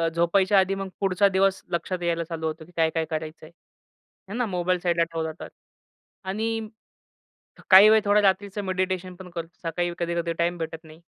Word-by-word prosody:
झोपायच्या 190 +4 +3
आधी 190 +1 +1
मग 195 0 -4
पुढचा 195 0 +3
दिवस 190 0 +1
लक्षात 175 +1 -2
यायला 170 -1 0
चालू 165 -1 -6
होतो, 160 0 -6
की 180 - -19
काय-काय 160 0 +1
करायचंय. 155 0 -6 0.8
है - - -6
ना. 245 -1 0
मोबाईल 180 -2 -1
साईडला 170 -1 +2
ठेवला 165 -1 -3
तर - - -7 0.8
आणि 220 +2 -2 1.0
काही 195 +3 +9
वेळ 220 0 +5
थोडा 205 +1 +4
रात्रीच 200 0 +1
मेडिटेशनपण 185 -1 -3
करतो. 170 -1 -6 0.2
सकाळी 175 +1 -2
कधी-कधी 170 0 -1
टाईम 170 +1 +1
भेटत 160 0 -5
नाही. 160 +1 -15
180 Hz, 160 wpm, -25 LUFS, 165-195 Hz, 1.0 s, काही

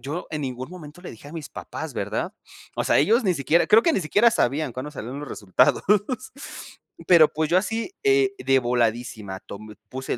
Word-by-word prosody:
yo 145 +8 -5
en 155 -2 -3
ningún 130 +1 -5
momento 170 -2 -11
le - - -7
dije 115 - -13
a - - -12
mis 160 -3 -7
papás, - - -7
¿verdad? - - -3 0.4
O - - -1
sea, - - +3
ellos 225 - +3
ni 185 - +2
siquiera 155 +4 +2
creo 220 +2 +6
que 330 - +3
ni - - +1
siquiera 205 +8 +4
sabían 145 - 0
cuándo 130 +4 -6
salieron 130 +1 -6
los 150 - -7
resultados. 105 +5 +2 1.3
Pero, 170 -4 +8
pues, 155 0 -1
yo 180 - +5
así 225 - -3
eh, 405 -1 +3
de 135 0 +3
voladísima, 115 -5 -1
tom 105 +1 -10
puse, 130 +3 -4
150 Hz, 195 wpm, -24 LUFS, 125-180 Hz, 1.3 s, Pero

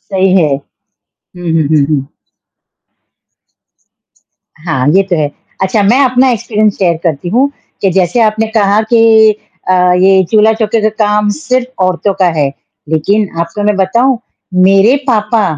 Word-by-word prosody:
सही 190 -1 -1
है। 150 -3 +1 0.6
हुँ, 175 -2 -8
हुँ, 160 -2 0
हुँ, 150 -2 +2
हुँ। 140 -3 -2 2.6
हाँ, 135 -5 -1
ये 190 +6 +3
तो 190 -2 -2
है। 150 -2 -1 0.3
अच्छा, 190 +3 0
मैं 230 +7 +2
अपना 255 0 +2
एक्सपीरियंस 215 -2 -1
शेयर 175 -4 +1
करती 165 0 -2
हूँ 255 +8 +1 0.3
कि 195 - +2
जैसे 185 +5 0
आपने 220 0 0
कहा 205 0 +2
कि 220 -1 +5 0.4
अ, - - +3
ये 180 +1 +3
चूल्हा-चौके 220 0 +2
का 215 - +2 0.2
काम 210 0 0
सिर्फ़ 255 -3 -3
औरतों 185 +2 0
का 185 - +4
है, 145 - +2 0.4
लेकिन 195 +7 0
आपको 170 +5 -4
मैं 210 0 +1
बताऊँ, 235 +7 +1 0.4
मेरे 195 +7 +4
पापा 220 -1 +1
200 Hz, 145 wpm, -11 LUFS, 180-220 Hz, 2.6 s, कि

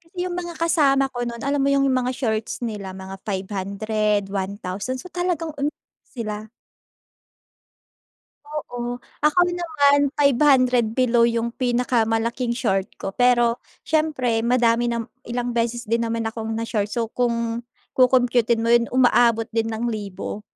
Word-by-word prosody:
Kasi 335 +2 -28
yung 355 -1 -3
mga 345 -1 -5
kasama 275 -5 +2
ko 245 -1 -3
no'n, 235 -1 -6
alam 280 0 0
mo 275 - +2
yung 275 0 +3
mga 255 0 +1
shorts 220 -2 -2
nila 205 -5 -4
mga 190 0 -8
₱500, 205 +2 -1
₱1,000 200 +4 -3
so 355 +7 -10
talagang 350 -3 -2
umiiyak 290 +2 -1 0.3
sila. 215 -3 -6 2.0
Oo, 245 -5 -4 0.2
ako 300 +4 +3
din 355 0 -3
naman 285 -4 +3 0.2
₱500 255 -4 +4
below 240 -2 +4
yung 235 0 +1
pinakamalaking 235 -1 0
short 195 -6 0
ko. 195 - -5
Pero, 240 -1 +3 0.2
siyempre 260 -8 +1
madami 235 0 +2
nam 230 -1 -2 0.2
ilang 240 0 -3
beses 235 0 -1
din 230 +2 +1
naman 230 0 -2
akong 225 0 -4
na-short. 220 -2 -2
So 235 -2 -1
kung 235 -1 -1 0.3
kokompyutin 245 -3 +3
mo 230 - 0
'yon, 235 -1 +3
umaabot 240 -3 +4
din 225 0 +1
ng 225 +2 -2
libo, 210 -2 -5
235 Hz, 140 wpm, -23 LUFS, 225-255 Hz, 2.0 s, ₱500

